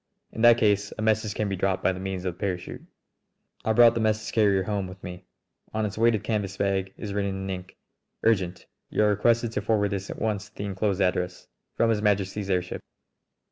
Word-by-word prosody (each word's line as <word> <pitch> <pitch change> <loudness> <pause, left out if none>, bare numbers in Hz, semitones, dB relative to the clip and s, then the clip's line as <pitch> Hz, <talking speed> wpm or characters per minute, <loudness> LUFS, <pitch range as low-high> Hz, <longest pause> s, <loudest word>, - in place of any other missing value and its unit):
In 110 - -5
that 120 0 +7
case 105 -2 +2
a - - -4
message 110 -1 +1
can 105 - -1
be 100 - -1
dropped 95 0 0
by 95 - +3
means 95 0 -4
of 90 - -1
the - - -25
parachute." 90 -4 -3 0.8
I 110 - +1
brought 115 +1 +7
the 115 - -1
message 110 0 0
carrier 100 -4 +3
home 100 -1 -2
with 90 +1 -12
me. 90 +1 -8 0.5
On 110 0 +1
its 100 - -4
weighted 110 -2 +2
canvas 105 -4 -2
bag 95 -1 0
is 105 -3 -5
written 100 -1 -1
in 95 0 -5
ink: 90 0 -7 0.5
"Urgent! 95 -5 +1 0.2
You - - +1
are 105 - +4
requested 115 +3 +2
to - - -2
forward 105 -2 +1
this 95 -1 -3
at - - -6
once 105 -2 -2
to 105 - -37
the - - -5
inclosed 100 0 -1
address. 90 -1 0 0.3
From 115 -1 +3
His 105 -2 0
Majesty's 100 -1 0
airship 90 -1 -1
100 Hz, 210 wpm, -26 LUFS, 95-110 Hz, 0.8 s, that